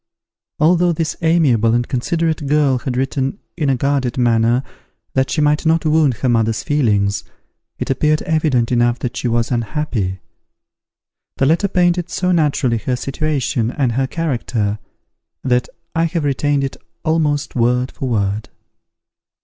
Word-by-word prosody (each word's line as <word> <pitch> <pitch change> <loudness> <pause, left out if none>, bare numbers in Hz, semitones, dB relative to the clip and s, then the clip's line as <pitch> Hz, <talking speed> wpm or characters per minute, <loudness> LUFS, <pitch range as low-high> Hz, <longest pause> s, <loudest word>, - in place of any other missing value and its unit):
Although 175 +2 +3
this 160 0 -2
amiable 135 -9 +3
and 120 0 0
considerate 160 +3 -1
girl 140 -3 +2
had 125 0 -3
written 135 +4 -1 0.2
in 150 -5 0
a 135 - +3
guarded 135 -1 0
manner 120 +1 +2 0.5
that 130 0 +1
she 155 - 0
might 150 +1 +2
not 165 0 +2
wound 155 -4 +3
her 130 - -2
mother's 115 -2 +1
feelings, 105 -9 +1 0.5
it - - -2
appeared 155 +3 +1
evident 150 -7 +1
enough 120 0 +2
that 125 - -4
she - - -2
was 115 0 0
unhappy. 115 -6 -2 1.2
The 135 - +2
letter 165 +8 +3
painted 175 -2 +1
so 185 0 0
naturally 140 -8 +1
her 125 +4 -1
situation 135 -4 -1
and 130 -1 0
her 130 +3 0
character, 115 -9 -2 0.6
that 125 -1 +1 0.2
I 165 0 +2
have 165 -1 -1
retained 145 0 +1
it 135 - -4 0.3
almost 150 -3 0
word 125 +1 +1
for 130 - -4
word. 105 -2 -1
135 Hz, 145 wpm, -18 LUFS, 120-155 Hz, 1.2 s, Although